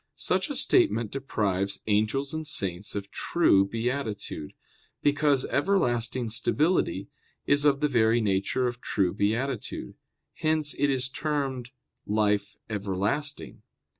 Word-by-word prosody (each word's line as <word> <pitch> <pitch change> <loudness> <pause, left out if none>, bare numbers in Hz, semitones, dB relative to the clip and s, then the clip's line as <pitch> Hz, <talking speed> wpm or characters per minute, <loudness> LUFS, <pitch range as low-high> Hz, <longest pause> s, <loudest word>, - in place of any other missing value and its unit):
Such - - 0
a - - -3
statement 110 +1 +2
deprives 100 -8 -1
angels 110 +7 +1
and 155 -1 -4
saints 100 - -2
of 100 -1 -5
true 100 - +3
beatitude, 115 - -3 0.5
because 145 -2 +3
everlasting 125 - 0
stability 130 - +1 0.4
is 145 +1 +3
of 140 -1 +3
the 150 - +4
very 115 -3 +3
nature 100 +4 0
of 125 0 -3
true 95 -3 0
beatitude; 115 +5 -2 0.4
hence 155 -2 0
it 145 +1 +3
is 130 -1 +1
termed 135 -3 -2 0.4
"life 105 -1 +1
everlasting." 105 +8 -2
120 Hz, 115 wpm, -27 LUFS, 105-140 Hz, 0.5 s, the